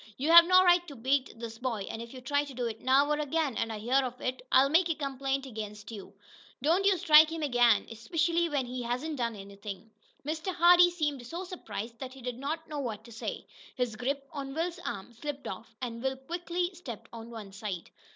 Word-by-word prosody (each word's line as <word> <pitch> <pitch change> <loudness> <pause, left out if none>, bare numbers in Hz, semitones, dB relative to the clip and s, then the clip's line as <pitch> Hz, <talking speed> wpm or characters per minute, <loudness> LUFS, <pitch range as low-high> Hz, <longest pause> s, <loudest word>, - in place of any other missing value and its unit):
You 295 +5 +1
have 340 0 +11
no 370 +1 +6
right 350 -1 +4
to 285 - -9
beat 265 +3 +1
this 225 -1 -7
boy, 235 -5 -2
and 225 - -5
if 235 0 -9
you 255 - -9
try 285 +3 +1
to 275 -3 -10
do 245 -1 -2
it 225 -1 -4
now, 270 +2 +4
or 300 - +1
again, 300 -3 0
and 230 0 -1
I 220 - -4
hear 245 +6 +2
of 250 0 -5
it, 255 0 -3
I'll 265 +1 +6
make 335 +4 +3
a 325 - +1
complaint 275 -1 -2
against 210 -3 -7
you. 205 -4 -9 0.5
Don't 340 +6 +3
you 390 -2 +4
strike 315 -2 +7
him 325 -1 -4
again, 245 -5 +4
especially 330 +9 0
when 285 -4 0
he 250 +1 -5
hasn't 255 +6 -3
done 235 -2 -1
anything." 200 +2 -9 0.3
Mr. 320 +5 -3
Hardee 350 0 +7
seemed 295 -7 -2
so 340 +7 -5
surprised 235 - -7
that 260 -1 -7
he 265 - -12
did 250 -1 -4
not 315 +4 -3
know 300 -2 -5
what 220 -6 -4
to 235 - -14
say. 225 - -5 0.3
His 245 -4 -1
grip 275 +4 -2
on 275 -2 -6
Will's 340 +2 -2
arm 200 - -6
slipped 280 +3 -6
off, 225 +4 -8
and 230 -2 -4
Will 265 +1 -1
quickly 350 +5 -3
stepped 270 - -9
to 230 - -8
one 225 -3 -9
side. 195 -4 -6
265 Hz, 220 wpm, -30 LUFS, 230-320 Hz, 0.5 s, have